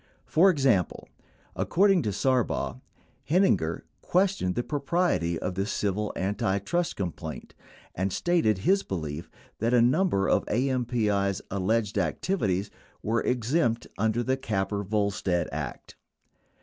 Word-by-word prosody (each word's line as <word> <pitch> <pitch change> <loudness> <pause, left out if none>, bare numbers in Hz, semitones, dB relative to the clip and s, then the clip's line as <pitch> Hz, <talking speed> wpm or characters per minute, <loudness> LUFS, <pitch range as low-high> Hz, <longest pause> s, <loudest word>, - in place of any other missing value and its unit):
For 180 +5 +5
example, 135 - +1 0.5
according 195 0 +3
to 105 - -1
Sarbaugh, 125 +2 0 0.5
Heininger 165 - +2 0.2
questioned 185 - +1
the 120 - 0
propriety 145 - 0
of 90 +3 -3
the 95 +2 -2
civil 105 0 -1
antitrust 100 - -1
complaint, 85 -4 -5 0.4
and 95 +2 -1
stated 165 - +2
his 195 - +2
belief 80 - -5 0.3
that 115 +3 +2
a - - +6
number 130 - +2
of - - +2
AMPI's 115 -6 0
alleged 100 +2 0
activities 100 - -1 0.3
were 115 +2 +1
exempt 120 0 0
under 110 +3 +1
the 130 +2 0
Capper 100 -5 -2
Volstead 100 -3 0
Act. - - -6
110 Hz, 115 wpm, -27 LUFS, 95-135 Hz, 0.5 s, a